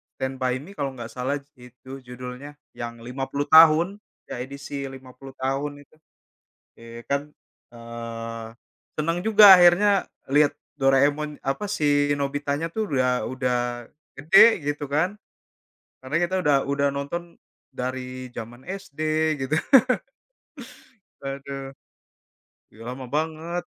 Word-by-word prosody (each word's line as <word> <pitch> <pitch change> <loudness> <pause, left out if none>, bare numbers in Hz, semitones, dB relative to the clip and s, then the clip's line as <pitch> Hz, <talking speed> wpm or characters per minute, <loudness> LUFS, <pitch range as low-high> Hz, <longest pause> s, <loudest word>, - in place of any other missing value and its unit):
Stand 130 0 -4
by 130 -1 0
Me 180 - -12
kalau 135 -2 -3
nggak 115 -2 -8
salah 130 +3 -2
s 140 - -32
itu 125 +2 -12
judulnya. 125 +3 -9 0.2
Yang 115 -1 -7
50 135 +3 -4
tahun, 165 +5 +7 0.3
ya - - -5
edisi 140 +1 -6
50 130 0 -12
tahun 140 +2 -3
itu. 155 - -28 0.9
Iya 115 0 -10
kan, 140 0 +1 0.5
eee, 115 -1 -7 0.5
senang 165 +3 0
juga 215 -1 +7
akhirnya 185 +3 +5 0.2
liat 145 0 +4 0.3
Doraemon, 145 +3 +2
apa, 135 +10 -2
si 145 -5 +2
Nobita-nya 145 +2 -2
tuh 220 +1 -2
udah, 125 -2 +1
udah 125 -1 -1 0.6
gede 170 +6 +6
gitu 145 0 -2
kan, 180 +8 0 0.9
karena 130 +4 -4
kita 175 +2 0
udah 145 -1 +4
udah 140 0 +1
nonton 170 +5 -5 0.4
dari 130 0 -5
jaman 120 +3 -8
SD 190 -6 -8 0.5
gitu. 150 - 0 1.7
Waduh. 135 0 -6 1.0
Iya, 110 - -18
lama 130 +1 -6
banget. 160 +3 -3
140 Hz, 120 wpm, -24 LUFS, 130-155 Hz, 1.7 s, tahun